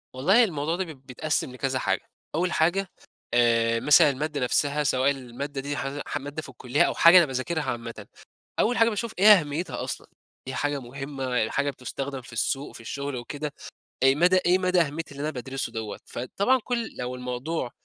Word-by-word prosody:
والله 190 Hz, -, +5 dB
الموضوع 160 Hz, -5 st, -1 dB
ده 190 Hz, -, -1 dB
ب 135 Hz, -2 st, -23 dB
بيتقسم 140 Hz, +1 st, -2 dB
لكذا 130 Hz, +1 st, -2 dB
حاجة، -, -, -1 dB, 0.3 s
أول 180 Hz, +3 st, +1 dB
حاجة، 180 Hz, +4 st, +2 dB, 0.5 s
آآ 115 Hz, -1 st, +3 dB
مثلًا 150 Hz, +3 st, +6 dB
المادة 145 Hz, +1 st, -2 dB
نفسها 145 Hz, +4 st, +1 dB
سواء 130 Hz, 0 st, +2 dB
المادة 135 Hz, +1 st, -5 dB
دي 145 Hz, +1 st, -3 dB
ه 140 Hz, +1 st, -4 dB
ح -, -, -2 dB
مادة 145 Hz, +2 st, -6 dB
في 145 Hz, -, -11 dB
الكُليّة 130 Hz, +4 st, +1 dB
أو -, -, +1 dB
حاجة 170 Hz, +2 st, +8 dB
أنا 175 Hz, -, +7 dB
باذاكرها 145 Hz, +4 st, -2 dB
عامةً، 115 Hz, -5 st, -5 dB, 0.5 s
أول 245 Hz, +3 st, +2 dB
حاجة 230 Hz, -, +5 dB
باشوف 225 Hz, 0 st, -3 dB
إيه 195 Hz, -, +4 dB
أهميتها 150 Hz, +3 st, -4 dB
أصلًا، -, -, -5 dB, 0.4 s
هي 130 Hz, -, -4 dB
حاجة 145 Hz, 0 st, -1 dB
مهمة، 135 Hz, +2 st, -6 dB, 0.2 s
ال -, -, -4 dB
حاجة 140 Hz, +1 st, 0 dB
بتستخدم 135 Hz, +1 st, -5 dB
في 125 Hz, -, -14 dB
السوق، 135 Hz, +5 st, -2 dB
في -, -, -9 dB
الشغل 140 Hz, +4 st, -4 dB
وكده، 145 Hz, +4 st, -5 dB, 0.5 s
إيه 135 Hz, 0 st, +6 dB
مدى 180 Hz, +4 st, +4 dB
إيه 180 Hz, +1 st, +5 dB
مدى 185 Hz, -1 st, +2 dB
أهمية 160 Hz, +1 st, -2 dB
اللي 140 Hz, 0 st, -7 dB
أنا 150 Hz, -, -1 dB
بادرسه 130 Hz, -2 st, -4 dB
دوّة؟ 110 Hz, -2 st, -5 dB
فطبعًا 200 Hz, -, 0 dB
كل 235 Hz, -2 st, -3 dB
لو 125 Hz, 0 st, -3 dB
الموضوع 125 Hz, +3 st, -3 dB
140 Hz, 190 wpm, -26 LUFS, 130-165 Hz, 0.5 s, حاجة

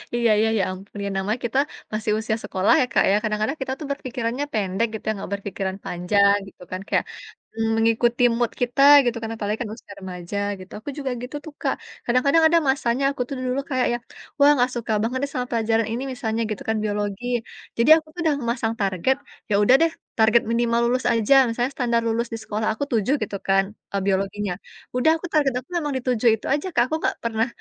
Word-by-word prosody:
Iya 235 Hz, -1 st, +2 dB
iya, 220 Hz, +1 st, +3 dB
ya 195 Hz, -, +2 dB
ampun, 195 Hz, +2 st, -10 dB
ya -, -, -2 dB
namanya 210 Hz, +5 st, -1 dB
kita 260 Hz, +4 st, +1 dB, 0.3 s
masih 215 Hz, 0 st, -1 dB
usia 220 Hz, 0 st, -1 dB
sekolah 190 Hz, +7 st, +2 dB
ya, -, -, +3 dB
Kak, -, -, +4 dB
ya, -, -, +4 dB
kadang-kadang 215 Hz, +6 st, -1 dB
kita 265 Hz, 0 st, -2 dB
tuh 300 Hz, -, -6 dB
berpikirannya 255 Hz, -1 st, -3 dB
pendek 205 Hz, +1 st, 0 dB
gitu -, -, -8 dB
ya, 220 Hz, -, +2 dB
enggak 195 Hz, -1 st, -7 dB
berpikiran 195 Hz, -1 st, -4 dB
panjang 200 Hz, +3 st, +3 dB
gitu, 190 Hz, -, -16 dB
kan. 185 Hz, +1 st, -4 dB
Kayak -, -, +1 dB, 0.7 s
mengikuti 230 Hz, +2 st, +2 dB
mood 240 Hz, -1 st, 0 dB
kita 245 Hz, +3 st, +1 dB, 0.2 s
gitu, 235 Hz, -1 st, 0 dB
kan, 225 Hz, -, -4 dB
apalagi 210 Hz, 0 st, -2 dB
kan 220 Hz, -, -3 dB
usia 215 Hz, -3 st, -13 dB
remaja, 180 Hz, +1 st, -6 dB, 0.2 s
gitu. 185 Hz, -, -12 dB
Aku 220 Hz, -, -7 dB
juga 270 Hz, -3 st, -3 dB
gitu 255 Hz, +4 st, -7 dB
tuh, 315 Hz, -, -9 dB
Kak. -, -, 0 dB, 0.3 s
Kadang-kadang 280 Hz, +7 st, +3 dB
ada 335 Hz, +1 st, +4 dB
masanya 265 Hz, -1 st, +1 dB
aku 265 Hz, -, -5 dB
tuh 275 Hz, -, -3 dB
dulu 255 Hz, +2 st, 0 dB
kayak 255 Hz, -2 st, +1 dB
yang, 240 Hz, -, -7 dB, 0.4 s
wah 285 Hz, +1 st, +7 dB
enggak 250 Hz, 0 st, +2 dB
suka 235 Hz, -1 st, -3 dB
banget 245 Hz, +3 st, -1 dB
deh 280 Hz, -, -2 dB
sama 250 Hz, -2 st, -1 dB
pelajaran 225 Hz, -1 st, +1 dB
ini, 240 Hz, +3 st, -2 dB
misalnya 225 Hz, -2 st, -2 dB
gitu 210 Hz, -, -4 dB
kan, 220 Hz, -, +1 dB
biologi. 205 Hz, +1 st, -2 dB, 0.5 s
Jadi, 235 Hz, +5 st, +3 dB
aku 310 Hz, -1 st, -6 dB
tuh 355 Hz, -, -9 dB
udah 310 Hz, -3 st, +2 dB
memasang 235 Hz, -1 st, -1 dB
target, 195 Hz, +6 st, +1 dB, 0.4 s
ya 200 Hz, -, +4 dB
udah 250 Hz, +5 st, +6 dB
deh, 330 Hz, -, +2 dB, 0.3 s
target 220 Hz, +1 st, +5 dB
minimal 235 Hz, 0 st, +2 dB
lulus 255 Hz, +1 st, 0 dB
aja, 230 Hz, +4 st, +3 dB
misalnya 245 Hz, +3 st, -1 dB
standar 235 Hz, -2 st, +1 dB
lulus 230 Hz, +1 st, 0 dB
di -, -, -2 dB
sekolah 215 Hz, 0 st, -2 dB
aku 285 Hz, -, -3 dB
7 230 Hz, +4 st, +2 dB
gitu 200 Hz, -1 st, -4 dB
kan, 195 Hz, 0 st, +4 dB, 0.3 s
eee, 200 Hz, -, 0 dB
biologinya. 195 Hz, 0 st, 0 dB, 0.4 s
Udah 285 Hz, +6 st, +4 dB
aku 350 Hz, -, -6 dB
target 290 Hz, -3 st, +3 dB
aku 255 Hz, -, -16 dB
memang 300 Hz, -4 st, -1 dB
di -, -, -4 dB
7 240 Hz, -1 st, +3 dB
itu -, -, -12 dB
aja, 295 Hz, +6 st, -1 dB
Kak, 240 Hz, -, +5 dB
aku 315 Hz, -, -1 dB
enggak -, -, +1 dB
pernah 225 Hz, +1 st, 0 dB
230 Hz, 215 wpm, -23 LUFS, 210-255 Hz, 0.7 s, wah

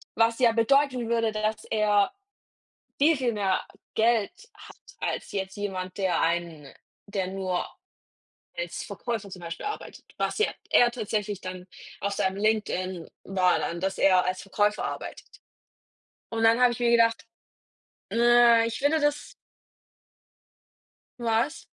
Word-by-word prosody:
Was 230 Hz, +1 st, +2 dB
ja 240 Hz, -3 st, +4 dB
bedeuten 250 Hz, +1 st, +2 dB
würde, 230 Hz, -2 st, +1 dB
dass 215 Hz, 0 st, -2 dB
er 210 Hz, -2 st, +2 dB, 0.9 s
viel, 310 Hz, +3 st, +4 dB
viel 255 Hz, -3 st, 0 dB
mehr 195 Hz, -3 st, 0 dB, 0.3 s
Geld 225 Hz, -2 st, +2 dB, 0.2 s
hat -, -, -14 dB, 0.2 s
als -, -, -3 dB
jetzt 190 Hz, -1 st, -4 dB
jemand, 185 Hz, -3 st, -4 dB
der 190 Hz, -4 st, +1 dB
einen 165 Hz, -4 st, -2 dB, 0.4 s
der 195 Hz, -2 st, -2 dB
nur 185 Hz, -1 st, -2 dB, 0.9 s
als -, -, -4 dB
Verkäufer 225 Hz, -4 st, -5 dB
zum 185 Hz, -, -8 dB
Beispiel 165 Hz, -1 st, -6 dB
arbeitet. 420 Hz, 0 st, -7 dB
Was -, -, -1 dB
ja 430 Hz, -, +3 dB, 0.2 s
eher 240 Hz, 0 st, +5 dB
tatsächlich 210 Hz, -4 st, -3 dB
dann 185 Hz, 0 st, -7 dB, 0.3 s
auf 200 Hz, 0 st, -1 dB
seinem 190 Hz, 0 st, -1 dB
LinkedIn 190 Hz, -5 st, -1 dB
war 185 Hz, -2 st, +2 dB
dann, 170 Hz, -, -3 dB
dass 190 Hz, +2 st, -2 dB
er 185 Hz, -2 st, +4 dB
als 185 Hz, 0 st, -2 dB
Verkäufer 205 Hz, +1 st, 0 dB
arbeitet. -, -, -8 dB, 0.9 s
Und 225 Hz, 0 st, -2 dB
dann 225 Hz, +1 st, +5 dB
habe 250 Hz, -1 st, +6 dB
ich 240 Hz, -, -6 dB
mir 240 Hz, -1 st, +2 dB
gedacht: 230 Hz, -1 st, +3 dB, 0.9 s
„Äh, 235 Hz, -1 st, +5 dB
ich 230 Hz, -, -3 dB
finde 290 Hz, +3 st, +2 dB
das" 295 Hz, 0 st, -1 dB, 1.9 s
Was? 235 Hz, +5 st, 0 dB
215 Hz, 135 wpm, -26 LUFS, 190-235 Hz, 1.9 s, habe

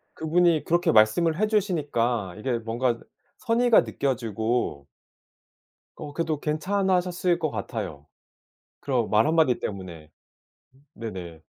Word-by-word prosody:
그분이 165 Hz, 0 st, +2 dB
그렇게 175 Hz, 0 st, +2 dB
말씀을 155 Hz, -, +3 dB
해 215 Hz, -, +3 dB
주시니까 145 Hz, -, 0 dB
이게 120 Hz, +1 st, -1 dB
뭔가 115 Hz, +2 st, -1 dB
그 -, -, -19 dB, 0.3 s
선의가 240 Hz, -1 st, +4 dB
느껴지고 115 Hz, -, -2 dB, 1.1 s
어 145 Hz, -1 st, -7 dB
그래도 155 Hz, -2 st, -2 dB
괜찮아하셨을 180 Hz, +1 st, 0 dB
것 -, -, -1 dB
같아요 70 Hz, 0 st, -5 dB, 0.7 s
그런 125 Hz, -5 st, -1 dB
말 110 Hz, +1 st, +4 dB
한마디 155 Hz, -6 st, +3 dB
때문에. 85 Hz, -6 st, -7 dB, 0.6 s
음 140 Hz, +2 st, -26 dB
네네. 90 Hz, -8 st, -7 dB
135 Hz, 270 characters per minute, -25 LUFS, 110-170 Hz, 1.1 s, 선의가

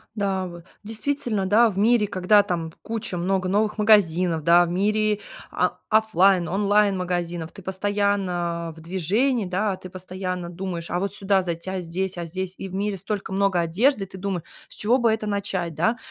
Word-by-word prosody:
Да, 195 Hz, -2 st, -1 dB
вы. 175 Hz, -1 st, -9 dB, 0.2 s
Действительно, 220 Hz, -1 st, -2 dB
да, 225 Hz, +4 st, +5 dB
в 195 Hz, -, -7 dB
мире, 220 Hz, +1 st, +4 dB
когда 200 Hz, +2 st, +4 dB
там 165 Hz, -4 st, -3 dB
куча 225 Hz, -5 st, -4 dB
много 185 Hz, +1 st, 0 dB
новых 210 Hz, +3 st, +1 dB
магазинов, 180 Hz, -6 st, +3 dB
да, 175 Hz, +2 st, +6 dB
в -, -, -5 dB
мире, 210 Hz, +3 st, +1 dB, 0.3 s
а, -, -, 0 dB
оффлайн, 195 Hz, -5 st, +4 dB
онлайн-магазинов, 180 Hz, -4 st, 0 dB
ты 195 Hz, -, -11 dB
постоянно 190 Hz, -4 st, -1 dB
в 160 Hz, -, -13 dB
движении, 200 Hz, -, 0 dB
да, 190 Hz, +1 st, -1 dB
ты 185 Hz, -, -10 dB
постоянно 185 Hz, -1 st, -5 dB
думаешь: 175 Hz, -1 st, -5 dB
"А 175 Hz, -, 0 dB
вот 200 Hz, +1 st, -2 dB
сюда 195 Hz, -1 st, +2 dB
зайти, 170 Hz, 0 st, -4 dB
а 190 Hz, 0 st, -2 dB
здесь, 180 Hz, +2 st, -3 dB
а 170 Hz, -, -3 dB
здесь". 185 Hz, +2 st, -5 dB
И 195 Hz, -, -6 dB
в 185 Hz, -, -11 dB
мире 200 Hz, +1 st, -1 dB
столько 195 Hz, +1 st, -4 dB
много 195 Hz, -2 st, +2 dB
одежды, 200 Hz, -, +2 dB
и 195 Hz, -, -7 dB
ты 190 Hz, -, -11 dB
думы 190 Hz, -3 st, -3 dB, 0.2 s
с -, -, -10 dB
чего 230 Hz, +4 st, +2 dB
бы 235 Hz, -3 st, +3 dB
это 220 Hz, -1 st, -3 dB
начать, 195 Hz, -5 st, -2 dB
да. 180 Hz, +10 st, +2 dB
190 Hz, 185 wpm, -24 LUFS, 175-210 Hz, 0.3 s, да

